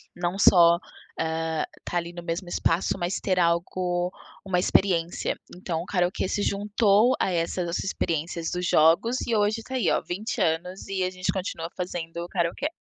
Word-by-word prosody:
Não 175 +2 -2
só, 170 -3 +6 0.4
hã, 160 -1 -1 0.2
estar 175 - -4
ali 170 0 -6
no 175 - -7
mesmo 175 +2 -4
espaço 170 +1 0
mas 175 +2 -1
ter 185 -2 +1
algo, 175 +1 0 0.3
uma 180 -2 +1
experiência, 175 -2 +1 0.2
então 170 -3 -3
o - - -7
karaokê 180 0 0
se 205 - -1
juntou 205 +4 +3
a 190 - +1
essas 170 0 -1
experiências 165 -2 -2
dos 180 0 -2
jogos 170 +11 +4
e 230 - +1
hoje 210 +2 +1
tá 260 - -6
aí 250 - +2
olha, - - +1
20 215 +6 -3
anos 180 +3 -1
e 190 -1 -1
a 185 - +1
gente 185 0 -2
continua 180 -3 -4
fazendo 170 -1 -4
karaokê. 170 - -1
180 Hz, 170 wpm, -26 LUFS, 170-195 Hz, 0.4 s, só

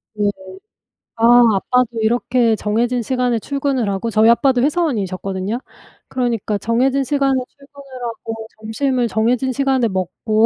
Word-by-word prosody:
네네. 205 -1 +1 0.9
아 240 +2 +6
아빠도 240 +2 0
이렇게 235 0 +2
정해진 235 +4 0
시간에 250 0 0
출근을 275 -3 -1
하고 200 +3 -2
저희 220 +1 +4
아빠도 250 +1 +3
회사원이셨거든요. 205 - -1 0.5
그러니까 235 -5 -1
'정해진 255 +6 +1
시간에 275 -2 +1
출근을 275 -2 -13
하고 225 -1 -5 0.2
점심을 240 +3 -1
정해진 235 +4 0
시간에 265 -3 +1
먹고 205 +4 0
240 Hz, 340 characters per minute, -18 LUFS, 220-260 Hz, 0.9 s, 아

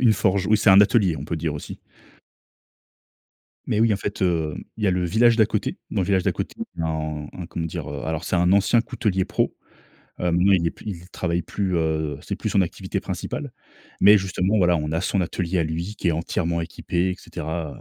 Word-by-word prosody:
Une 120 -4 +5
forge, 100 -2 +1
oui, 110 - +4
c'est 105 - +4
un 95 +1 +9
atelier, 100 -5 +3
on - - -6
peut 85 - -3
dire 80 -1 -2
aussi. 75 - -7 1.9
Mais 105 - +1
oui, 115 -1 +4
en - - +1
fait, 100 0 -4
heu, 80 -4 +1 0.2
il 105 - -3
y - - +3
a - - +4
le 90 -1 0
village 115 +6 +4
d'à 110 -3 +5
côté, - - -2
dans - - 0
le 90 - 0
village 95 -2 +2
d'à - - +1
côté, - - -5 0.3
en 75 -2 -2
un 90 -2 -7
comment 80 -1 -4
dire? 80 - -5
Heu, 70 -1 -5
alors 80 +1 -2
c'est 95 - 0
un 90 +2 +3
ancien 100 +4 +4
coutelier 95 -5 -1
pro, - - -1 0.7
heu, 90 -1 0
maintenant, 90 +3 +4
il 85 -3 +3
est 85 - +1
plus - - -17
il 90 -2 -6
travaille 85 -1 -1
plus, 95 +2 -2
heu, 80 -2 0
c'est - - -4
plus - - -2
son 100 - +3
activité 85 - -3
principale. - - -5 0.5
Mais 105 +2 +8
justement, 95 +2 0
voilà, 90 -2 +4
on 75 0 -3
a 80 - 0
son 100 - 0
atelier 90 0 -1
à - - +2
lui 85 +6 -4
qui 90 - -1
est - - +4
entièrement 85 +1 -1
équipé, 85 +2 -2
et 90 - -2
cetera, 80 -3 -5
90 Hz, 225 wpm, -23 LUFS, 80-100 Hz, 1.9 s, un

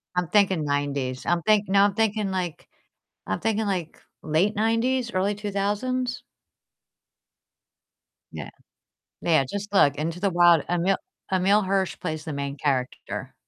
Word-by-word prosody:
I'm 180 -2 0
thinking 190 -5 +3
'90s, 140 -3 -2
I'm 175 0 +1
think 210 +2 +3
no, 195 +1 +4
I'm 205 -1 +3
thinking, 215 -2 +1
like, 180 -4 -4 0.6
I'm 95 - -2
thinking, 220 -1 0
like, 180 -5 -3 0.2
late 165 +7 +1
'90s, 235 +3 +1
early 195 +2 +1
2000s? 210 +5 -2 2.1
Yeah. - - -7 0.7
Yeah, 160 -5 +3
just 205 0 -5
look, 145 -7 +5
Into 165 +4 -3
the 200 +1 +1
Wild. 175 -3 +5
Emil 175 +2 +1 0.3
Emile 195 +3 +3
Hirsch 190 -1 0
plays 155 -1 -4
the 160 - -4
main 140 0 -4
character. 135 -3 -3
190 Hz, 135 wpm, -25 LUFS, 155-205 Hz, 2.1 s, look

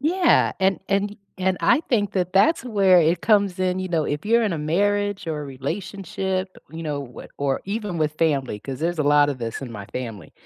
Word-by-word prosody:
Yeah, 345 +5 +3
and 190 0 +2
and 200 +1 +1
y 205 - -12 0.2
and 185 0 +1
I - - +4
think 205 -5 +1
that 180 -2 -1
that's 310 - +4
where 195 -6 +4
it 165 +2 +2
comes 200 -4 +3
in, 185 0 0
you 185 0 -3
know, 165 -3 0
if 145 +1 -3
you're 235 +2 +4
in 210 -4 0
a 165 - -2
marriage 205 +6 0
or 155 -2 -2
a - - -5
relationship, 185 +6 -4 0.2
you 165 +1 -7
know, 145 -3 -3
wh - - -9
or 140 -1 0
even 205 -3 -3
with 155 -1 +1
family, 140 -9 0
'cause 130 +5 -7
there's 170 +1 -1
a - - +2
lot 145 0 +4
of 140 -3 -3
this 115 -2 -4
in 130 - -6
my 100 -2 -8
family- 115 -9 -7
180 Hz, 225 wpm, -23 LUFS, 145-200 Hz, 0.2 s, I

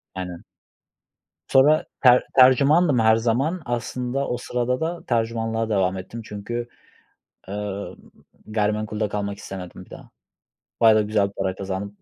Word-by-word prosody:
Aynen. 90 -2 -6 1.0
Sonra 150 +4 +4 0.2
ter 125 -1 +6
tercümandım 140 +3 +5
her 110 0 +5
zaman. 130 +10 0
Aslında 125 +2 -3
o 125 - -2
sırada 125 +1 -2
da 170 +1 -3
tercümanlığa 115 -1 -1
devam 95 -3 +1
ettim 105 +5 -7
çünkü, 120 +4 -5 0.8
eee, 100 0 -4 0.6
gayrimenkulde 105 0 -1
kalmak 100 -1 -4
istemedim 95 -3 -8
bir - - -24
daha. - - -12 0.7
Bayağı 110 -1 +6
da 105 - +3
güzel 105 -1 +1
bir - - -15
para 95 -1 -2
kazandım 100 +1 -5
110 Hz, 130 wpm, -23 LUFS, 100-125 Hz, 1.0 s, ter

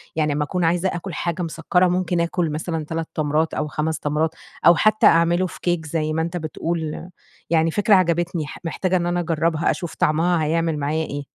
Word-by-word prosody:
يعني 155 -2 +1
لمّا 150 +1 0
أكون 180 +4 -2
عايزة 175 +3 +2
آكل 175 +1 -5
حاجة 170 +3 -2
مسكرة 175 +2 +1
ممكن 180 -1 0
أكل 170 -1 -1
مثلًا 160 +1 -3
3 165 +1 -4
تمرات، 155 +1 0
أو 150 - -2
5 155 +1 -2
تمرات، 155 +2 -1 0.3
أو 170 - +8
حتّى 215 +4 +3
أعمله 170 +2 +3
في - - -11
كيك 175 -2 0
زي 155 0 -2
ما 160 - 0
أنت 170 +2 -3
بتقول، 160 +1 -4 0.4
يعني 165 0 +2
فكرة 205 +3 +4
عجبتني 170 -3 +1
ح - - -9
محتاجة 185 +2 0
إن 175 - -1
أنا 175 0 0
أجربها، 165 -1 +1
أشوف 175 -3 -5
طعمها 165 0 +2
هيعمل 165 0 0
معايا 150 +2 -1
إيه. 145 -1 -6
165 Hz, 195 wpm, -22 LUFS, 155-175 Hz, 0.4 s, أو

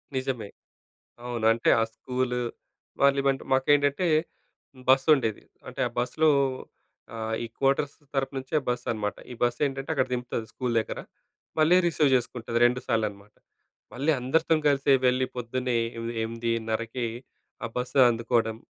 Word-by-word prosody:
నిజమే, 130 -5 -2 0.8
అవును. 120 -2 -3
అంటే 115 +1 -1
ఆ - - +3
స్కూలు, 125 0 -2 0.6
వాళ్ళేమంటే 140 -1 +3
మాకేంటంటే 145 +5 +3 0.8
బస్సుండేది. 135 -4 +4 0.3
అంటే, - - -7
ఆ - - -15
బస్సులో 155 +6 +2 0.8
ఆహ్, 110 0 -3
ఈ - - -3
క్వార్టర్స్ 140 +1 +1 0.2
తరపు 135 0 -1
నుంచే 135 +3 -2
బస్సనమాట. 115 -4 -2 0.2
ఈ - - -6
బస్సేంటంటే 135 +4 0
అక్కడ 130 -3 +1
దింపుతాది, 120 -2 -3
స్కూలు 125 -2 -2
దగ్గర. - - -5 0.6
మళ్ళీ 155 +3 +5
రిసీవ్ 155 -4 +2
జేసుకుంటాది. 120 -2 -1
2 125 +1 +3
సార్లనమాట. 105 -3 -2 0.6
మళ్ళీ 140 +6 +1
అందరితోని 155 +4 +1
కలిసి 140 -1 +3
వెళ్లి, 130 +1 +2
పొద్దున్నే 125 +1 -2 0.2
ఎ - - -4 0.2
ఎమిదిన్నరకి, 115 +1 -2 0.6
ఆ - - 0
బస్సు 125 +2 -2
అందుకోడం. 115 -1 0
125 Hz, 120 wpm, -27 LUFS, 115-135 Hz, 0.8 s, మళ్ళీ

